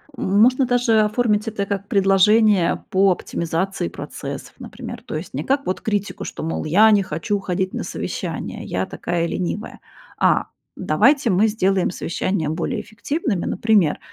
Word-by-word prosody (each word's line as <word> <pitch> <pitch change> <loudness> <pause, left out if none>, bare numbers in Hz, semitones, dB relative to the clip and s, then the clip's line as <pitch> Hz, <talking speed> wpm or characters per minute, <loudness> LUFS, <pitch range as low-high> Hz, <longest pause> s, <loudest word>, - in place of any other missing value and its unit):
Можно 240 +7 +3
даже 245 -3 +3
оформить 215 0 +1
это 210 -2 -2
как 200 0 -3
предложение 195 0 +3
по 195 0 +4
оптимизации 170 - -2
процессов, - - -7
например. - - -8
То - - -6
есть 155 +4 -6
не 145 +4 -3
как 280 +1 0
вот 185 - -2
критику, 205 -2 -2
что, - - -6
мол: 165 - -3
"Я 200 +8 +5
не 205 -2 +4
хочу 175 +5 -2
ходить 185 0 -2
на - - -3
совещания, - - -5
я 95 +1 -2
такая 170 - -2
ленивая". 185 +5 -4 0.4
А: - - +3 0.3
"Давайте 230 - +3
мы 200 +4 +4
сделаем 195 -4 +1
совещания 175 -1 -2
более 160 +2 -2
эффективными, 230 - -3
например, 205 -6 +2
195 Hz, 150 wpm, -21 LUFS, 180-220 Hz, 0.4 s, Я